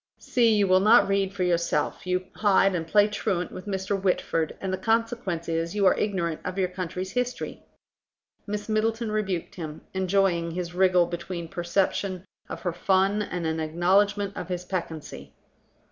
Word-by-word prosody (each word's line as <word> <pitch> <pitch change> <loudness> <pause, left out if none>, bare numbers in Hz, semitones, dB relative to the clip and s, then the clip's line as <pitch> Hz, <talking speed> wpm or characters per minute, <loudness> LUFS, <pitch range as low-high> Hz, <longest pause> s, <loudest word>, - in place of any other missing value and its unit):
"See, 230 -3 +2
you 205 -1 +3
will 185 0 +5
not 215 +5 +6
read 195 -1 +1
for 195 -2 -2
yourself, 170 -1 0
you 185 0 0
hide 195 -2 +3
and 165 -2 -2
play 205 +4 +5
truant 200 -4 -2
with 185 - -9
Mr. 195 0 -2
Whitford, 165 -4 0
and 190 -1 -3
the - - 0
consequence 225 -5 -1
is 165 +2 -2
you 205 -1 +2
are 185 - +6
ignorant 175 -6 -1
of 185 - -4
your 185 -2 +1
country's 185 +1 -5
history." 250 0 -3 0.9
Miss 210 0 -4
Middleton 225 +1 0
rebuked 195 -5 -2
him, 155 -3 -7
enjoying 190 -2 +1
his 175 +1 -4
wriggle 180 -1 +4
between 170 0 -5
a - - -13
perception 185 +2 -1 0.2
of - - -6
her 175 -3 -1
fun 195 +3 +2
and 180 -4 -3
an 160 0 -1
acknowledgment 195 +5 +1
of 180 - -6
his 180 0 -3
peccancy. 165 -4 -5
185 Hz, 170 wpm, -26 LUFS, 175-205 Hz, 0.9 s, not